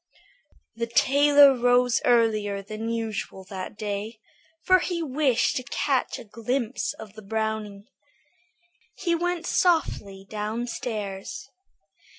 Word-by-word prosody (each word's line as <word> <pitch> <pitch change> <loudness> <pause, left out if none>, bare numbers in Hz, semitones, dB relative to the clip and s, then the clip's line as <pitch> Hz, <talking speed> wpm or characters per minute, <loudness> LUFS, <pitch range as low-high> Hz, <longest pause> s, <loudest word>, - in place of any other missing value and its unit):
The 235 0 -2
tailor 285 +3 +6
rose 245 0 +3
earlier 215 -4 +2
than 215 +3 -5
usual 220 -4 -4
that 190 +1 -6
day, 210 +1 -4 0.5
for 370 0 +6
he 350 -1 -2
wished 270 -4 +1
to 255 - -3
catch 265 -1 0
a - - -9
glimpse 235 +3 -2
of 210 -2 -11
the 215 - -11
brownies. 215 -1 -3 1.1
He 345 -3 -1
went 345 0 -1
softly 205 - +1
downstairs. 215 - -4
230 Hz, 110 wpm, -25 LUFS, 210-270 Hz, 1.1 s, tailor